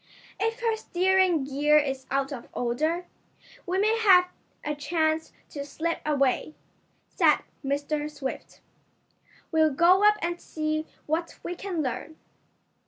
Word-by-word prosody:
"If 455 +2 -1
her 455 -1 +1
steering 370 -5 +2
gear 290 +2 +3
is 270 -3 -1
out 275 +1 0
of 240 -3 -8
order, 310 +9 -1 0.6
we 365 +2 0
may 435 +3 +2
have 365 -4 +6 0.4
a 300 - -1
chance 315 +1 -1 0.2
to 285 - -5
slip 325 +4 -3
away," 285 0 +1 0.5
said - - +3 0.2
Mr. 290 +2 -1
Swift 285 -3 -7 0.9
"We'll 315 -1 +4
go 345 +7 +4
up 420 0 +6
and 345 0 -2
see 310 0 -2 0.2
what 325 +3 -2
we 350 - -3
can 355 -3 -3
learn." 280 +4 -4
315 Hz, 130 wpm, -27 LUFS, 285-360 Hz, 0.9 s, have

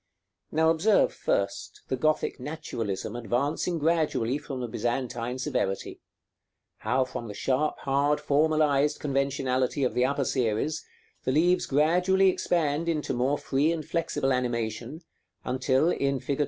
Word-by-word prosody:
Now 160 +1 +3
observe, 210 - +3
first, - - -2
the - - -1
Gothic 155 -2 0
naturalism 115 -8 -4
advancing 140 +9 -1
gradually 150 -5 +1
from 140 -3 -6
the 125 - -3
Byzantine 120 +2 -2
severity; 130 -8 -2 0.8
how 130 +4 +1
from 120 -2 -6
the 105 - -7
sharp, 135 +7 0
hard, 140 +2 +1
formalized 150 -1 +2
conventionality 135 -1 0
of 125 - +1
the 125 - +2
upper 140 0 0
series 125 +6 0 0.4
the 130 - 0
leaves 175 +6 +3
gradually 180 +7 +3
expand 165 -2 0
into 155 -4 -1
more 130 +4 +1
free 145 +4 +1
and 160 -3 -3
flexible 150 -5 0
animation, 120 +3 -2 0.4
until 130 +5 +2
in 140 -3 0
fig. 140 0 -3
140 Hz, 130 wpm, -27 LUFS, 125-155 Hz, 0.8 s, Now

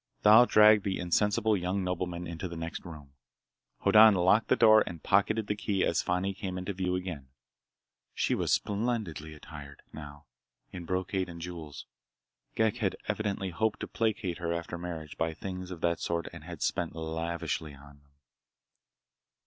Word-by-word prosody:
Thal 110 +4 +8
dragged 105 -1 +6
the 95 -1 -1
insensible 105 +5 +1
young 95 +1 -1
nobleman 90 -1 -3
into 85 +2 -5
the 85 - -8
next 80 0 -5
room. 75 -5 -11 0.7
Hoddan 110 -1 +7
locked 95 +5 +3
the - - +4
door 110 -1 +6
and 85 -2 -8
pocketed 105 +3 +2
the 105 - -2
key 100 -2 0
as - - +1
Fani 90 +2 -1
came 95 -1 -5
into 90 +2 -4
view 90 -1 -1
again. 90 -7 -5 0.9
She - - +1
was - - -1
splendidly 100 -8 -1
attired, 75 -2 -11
now, 75 -1 -10 0.5
in 90 -2 -7
brocade 95 +1 -2
and 85 -1 -9
jewels. 85 -4 -8 0.7
Ghek 110 +1 +1
had 105 -6 -1
evidently 105 -3 -2
hoped 105 +5 -1
to - - -3
placate 105 -6 -2
her 85 -1 -2
after 85 0 -4
marriage 85 -4 -7
by 80 0 -1
things 90 0 -6
of 90 -3 -8
that 85 -1 +1
sort 85 0 -2
and 80 -2 -11
had 85 -3 -6
spent 85 -2 -1
lavishly 80 -2 -4
for - - -17
them. 70 0 -17
90 Hz, 165 wpm, -29 LUFS, 85-100 Hz, 0.9 s, Thal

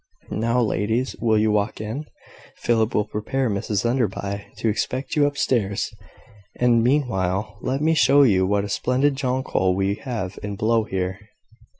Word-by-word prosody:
Now, 115 +3 +1
ladies, 115 +2 0
will 110 -2 +3
you 110 0 +3
walk 105 0 0
in? 115 +8 -5 0.5
Philip 115 -1 +1
will 105 - +2
prepare 115 +4 -2
Mrs 100 +2 -1
Enderby 100 -4 -1
to - - -1
expect 125 +5 -2
you 145 -1 +4
up 145 0 -4
stairs; 100 -8 0 0.6
and, 120 -2 +3
meanwhile, 105 -6 0
let 135 +3 -1
me 160 +1 +3
show 145 -2 +5
you 95 -7 +3
what 100 0 +1
a - - -3
splendid 130 +6 +1
jonquil 130 -9 0
we 95 +1 +1
have 110 -8 -4
in 105 0 -4
blow 110 +2 +1
here." 95 0 -3
110 Hz, 160 wpm, -23 LUFS, 100-130 Hz, 0.6 s, show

